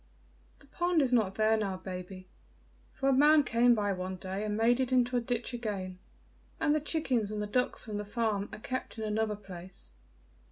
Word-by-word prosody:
"The -, -, -20 dB
pond 350 Hz, +4 st, 0 dB
is 255 Hz, -2 st, 0 dB
not 210 Hz, -5 st, +2 dB
there 220 Hz, 0 st, +3 dB
now, 200 Hz, -4 st, -1 dB
baby, 185 Hz, 0 st, -8 dB, 0.6 s
for 270 Hz, -, -2 dB
a -, -, +4 dB
man 295 Hz, +3 st, +6 dB
came 240 Hz, -1 st, +4 dB
by 205 Hz, -2 st, 0 dB
one 185 Hz, 0 st, -4 dB
day 190 Hz, +2 st, -4 dB
and 210 Hz, 0 st, -2 dB
made 235 Hz, +3 st, +3 dB
it 260 Hz, -1 st, 0 dB
into 250 Hz, -1 st, +3 dB
a 245 Hz, -, +2 dB
ditch 240 Hz, +1 st, -2 dB
again; 195 Hz, -6 st, -4 dB, 0.6 s
and 295 Hz, -, +3 dB
the 305 Hz, -, +1 dB
chickens 265 Hz, -9 st, 0 dB
and 210 Hz, -, -3 dB
the 210 Hz, -, -1 dB
ducks 250 Hz, +5 st, -1 dB
from 215 Hz, -2 st, -4 dB
the 210 Hz, -, -3 dB
farm 210 Hz, -1 st, -1 dB
are -, -, -7 dB
kept 255 Hz, +2 st, -5 dB
in 220 Hz, -, -4 dB
another 215 Hz, 0 st, 0 dB
place. 185 Hz, -2 st, -10 dB
220 Hz, 200 wpm, -31 LUFS, 200-250 Hz, 0.6 s, man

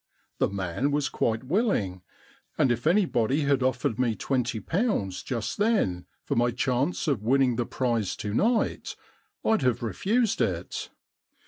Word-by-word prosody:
The -, -, +2 dB
man 100 Hz, +7 st, -1 dB
was 145 Hz, 0 st, 0 dB
quite 110 Hz, +1 st, -1 dB
willing, 130 Hz, -, 0 dB, 0.6 s
and 130 Hz, -, +3 dB
if 120 Hz, +4 st, -1 dB
anybody 155 Hz, -, +2 dB
had 140 Hz, -2 st, +2 dB
offered 130 Hz, -1 st, 0 dB
me 120 Hz, -3 st, +1 dB
twenty 125 Hz, 0 st, -1 dB
pounds 165 Hz, -, -1 dB
just 120 Hz, -, -4 dB
then 200 Hz, -, +1 dB, 0.2 s
for -, -, -2 dB
my 120 Hz, +1 st, +3 dB
chance 130 Hz, +8 st, 0 dB
of 135 Hz, -9 st, +1 dB
winning 130 Hz, +2 st, +3 dB
the 120 Hz, 0 st, -1 dB
prize 120 Hz, -6 st, -1 dB
to 105 Hz, -1 st, -4 dB
night 225 Hz, -, +1 dB, 0.5 s
rd 220 Hz, -6 st, +3 dB
have 125 Hz, -3 st, +1 dB
refused 210 Hz, -, 0 dB
it. -, -, -2 dB
125 Hz, 145 wpm, -27 LUFS, 115-155 Hz, 0.6 s, and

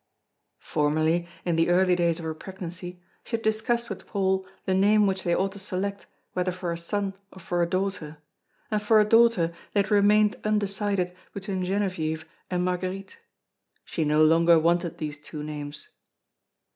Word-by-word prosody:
Formerly, 155 Hz, +3 st, +1 dB, 0.2 s
in 170 Hz, -2 st, +1 dB
the 165 Hz, +1 st, +3 dB
early 180 Hz, +1 st, +4 dB
days 170 Hz, -2 st, +1 dB
of 170 Hz, -, -7 dB
her 160 Hz, -, -2 dB
pregnancy, 180 Hz, 0 st, -8 dB, 0.2 s
she 230 Hz, -, -3 dB
had 225 Hz, -, -4 dB
discussed 230 Hz, +2 st, 0 dB
with -, -, -7 dB
Paul 190 Hz, -2 st, 0 dB, 0.2 s
the 190 Hz, -, +1 dB
name 205 Hz, +2 st, +4 dB
which 190 Hz, -1 st, 0 dB
they 175 Hz, -1 st, +1 dB
ought 195 Hz, +1 st, 0 dB
to 200 Hz, -, -9 dB
select 200 Hz, +1 st, -3 dB, 0.3 s
whether 180 Hz, 0 st, 0 dB
for 180 Hz, -1 st, -4 dB
a 170 Hz, -, -3 dB
son 195 Hz, +3 st, -2 dB, 0.2 s
or -, -, -15 dB
for 175 Hz, -1 st, -1 dB
a 170 Hz, -, +1 dB
daughter; 185 Hz, -5 st, -2 dB, 0.5 s
and 210 Hz, -1 st, +1 dB
for 215 Hz, +1 st, +5 dB
a 210 Hz, -, +5 dB
daughter 225 Hz, -6 st, +4 dB, 0.2 s
they 200 Hz, -, +5 dB
had 200 Hz, -, -4 dB
remained 210 Hz, +1 st, +4 dB
undecided 200 Hz, -3 st, 0 dB, 0.2 s
between 190 Hz, -1 st, -3 dB
Genevieve 180 Hz, -5 st, -1 dB, 0.2 s
and 180 Hz, -1 st, 0 dB
Marguerite. 185 Hz, +2 st, -3 dB, 0.7 s
She 160 Hz, -, -2 dB
no 150 Hz, +1 st, +4 dB
longer 165 Hz, +1 st, +5 dB
wanted 170 Hz, +1 st, +1 dB
these 150 Hz, -2 st, -5 dB
two 150 Hz, 0 st, -7 dB
names. 150 Hz, 0 st, -6 dB
185 Hz, 170 wpm, -26 LUFS, 170-200 Hz, 0.7 s, for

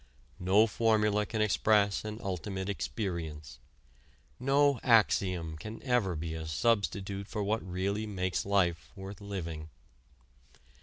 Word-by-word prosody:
No 95 Hz, +4 st, +5 dB
formula 105 Hz, -2 st, +2 dB
can 110 Hz, -2 st, 0 dB
express 105 Hz, -1 st, +3 dB
an 105 Hz, +1 st, -5 dB
ultimate 95 Hz, +1 st, -3 dB
experience; 85 Hz, -, -4 dB, 0.8 s
no 140 Hz, 0 st, +3 dB
axiom 90 Hz, -, +2 dB
can 110 Hz, +5 st, -7 dB
ever 120 Hz, -9 st, +1 dB
be 80 Hz, +1 st, -4 dB
a 80 Hz, -1 st, -5 dB
substitute 100 Hz, +1 st, 0 dB
for 105 Hz, -2 st, -3 dB
what 110 Hz, +3 st, 0 dB
really 100 Hz, +4 st, -2 dB
makes 95 Hz, -3 st, -1 dB
life 85 Hz, -6 st, +1 dB
worth 100 Hz, +1 st, -8 dB
living. 85 Hz, -6 st, -5 dB
100 Hz, 115 wpm, -31 LUFS, 90-110 Hz, 0.8 s, No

